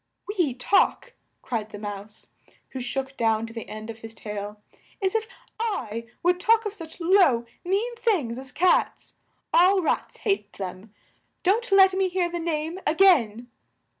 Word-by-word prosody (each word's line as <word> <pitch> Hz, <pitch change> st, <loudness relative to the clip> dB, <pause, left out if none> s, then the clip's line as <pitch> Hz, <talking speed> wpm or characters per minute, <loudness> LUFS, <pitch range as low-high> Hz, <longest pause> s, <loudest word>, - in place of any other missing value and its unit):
"We 355 Hz, -, 0 dB
talk!" 385 Hz, +10 st, +2 dB, 0.3 s
cried 220 Hz, -4 st, -3 dB
the 205 Hz, -, -8 dB
Mouse, 205 Hz, 0 st, -7 dB, 0.4 s
who 260 Hz, -, -6 dB
shook 270 Hz, +2 st, -3 dB
down 225 Hz, -2 st, +1 dB
to 230 Hz, -, -10 dB
the 230 Hz, -, -7 dB
end 215 Hz, +1 st, -6 dB
of 225 Hz, -, -13 dB
his 225 Hz, 0 st, -9 dB
tail. 210 Hz, 0 st, -6 dB, 0.4 s
"As 380 Hz, -1 st, 0 dB
if 445 Hz, 0 st, 0 dB, 0.3 s
I 230 Hz, -, -3 dB, 0.2 s
would 355 Hz, +1 st, +3 dB
talk 450 Hz, +3 st, +3 dB
of 420 Hz, -, -3 dB
such 330 Hz, -5 st, -10 dB
low, 335 Hz, -10 st, +4 dB, 0.2 s
mean 410 Hz, +7 st, -1 dB
things 295 Hz, -, 0 dB
as 265 Hz, 0 st, -10 dB
cats! 355 Hz, +6 st, +1 dB, 0.4 s
All 375 Hz, +3 st, +6 dB
rats -, -, -1 dB
hate 395 Hz, -2 st, -1 dB
them. 190 Hz, +2 st, -7 dB, 0.5 s
Don't 435 Hz, +5 st, +1 dB
let 385 Hz, -1 st, +7 dB
me 380 Hz, 0 st, +1 dB
hear 355 Hz, -1 st, 0 dB
the 345 Hz, -, -3 dB
name 325 Hz, +1 st, -2 dB
a 310 Hz, -, +2 dB
gain!" 245 Hz, -, +4 dB
310 Hz, 165 wpm, -25 LUFS, -, 0.5 s, let